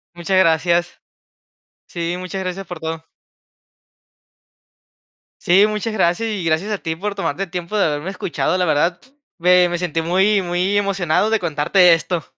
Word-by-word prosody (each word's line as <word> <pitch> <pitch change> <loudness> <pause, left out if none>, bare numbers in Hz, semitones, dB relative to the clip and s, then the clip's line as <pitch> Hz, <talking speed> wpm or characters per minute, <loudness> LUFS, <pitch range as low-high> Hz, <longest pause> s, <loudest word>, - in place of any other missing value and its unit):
Muchas 175 +2 -1
gracias. 170 0 +1 0.9
Sí, 170 0 -4
muchas 185 +1 -5
gracias 185 +1 -5
por 175 -2 -8
todo. 160 0 -5 2.4
Sí, 190 +4 +4
muchas 215 +1 -3
gracias, 190 +2 +1
y 205 -4 -3
gracias 165 +6 0
a 210 - -1
ti 160 -3 -4
por 200 +4 -4
tomarte 195 -2 -2
el 185 - -9
tiempo 180 +3 -4
de 205 - +3
haberme 150 +4 -2
escuchado, 180 -1 -2
la 180 - +1
verdad, 165 +2 +1 0.4
me 180 +1 +4
me 175 0 -2
sentí 170 -2 -2
muy 190 +5 +2
muy 180 +3 -1
emocionado 195 -1 +1
de 225 0 +1
contarte 170 +2 +3
esto. 165 +1 -2
180 Hz, 155 wpm, -19 LUFS, 170-195 Hz, 2.4 s, Sí